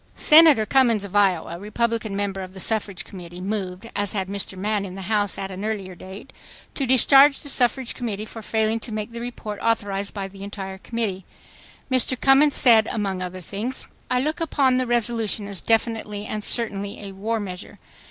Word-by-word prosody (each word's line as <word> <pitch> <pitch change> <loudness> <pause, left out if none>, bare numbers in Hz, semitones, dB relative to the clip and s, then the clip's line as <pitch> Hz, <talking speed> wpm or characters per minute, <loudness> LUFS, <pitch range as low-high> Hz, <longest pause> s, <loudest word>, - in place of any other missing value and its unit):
Senator 305 -8 +7
Cummins 230 -4 +2
of 200 0 -9
Iowa, 185 -4 +1
Republican 220 0 -2
member 200 -1 -3
of 185 0 -9
the - - -8
Suffrage 200 -1 -1
Committee, 175 -2 -10
moved, 190 +1 -4
as 205 -1 +1
had 190 -2 -3
Mr. 200 -1 -3
Mann 205 +1 -1
in 185 -2 -7
the 195 - -7
House 205 0 0
at 195 0 -5
an 190 +2 -7
earlier 205 -4 -4
date, 190 +7 -11 0.4
to 275 - -3
discharge 270 +3 +6
the 285 - -4
Suffrage 250 -1 +1
Committee 215 -4 -5
for 225 +1 -10
failing 220 +1 0
to 225 - -9
make 215 +1 -4
the 235 0 -7
report 220 -4 -6
authorized 200 -3 -1
by 195 -2 -5
the 195 0 -14
entire 195 -1 -7
Committee. 210 -4 -3 0.7
Mr. 255 0 +3
Cummins 275 +2 +5
said, 225 -4 +7
among 195 -4 -2
other 185 0 -6
things: 210 +8 -4
"... - - -34
I 250 - +1
look 305 +4 -2
upon 275 -5 +2
the 255 -1 0
resolution 230 -3 -1
as 200 -3 -6
definitely 225 -2 -1
and 215 -1 -5
certainly 205 -3 -1
a 200 - -7
war 220 +4 -3
measure. 185 -3 -8
210 Hz, 190 wpm, -23 LUFS, 195-235 Hz, 0.7 s, Senator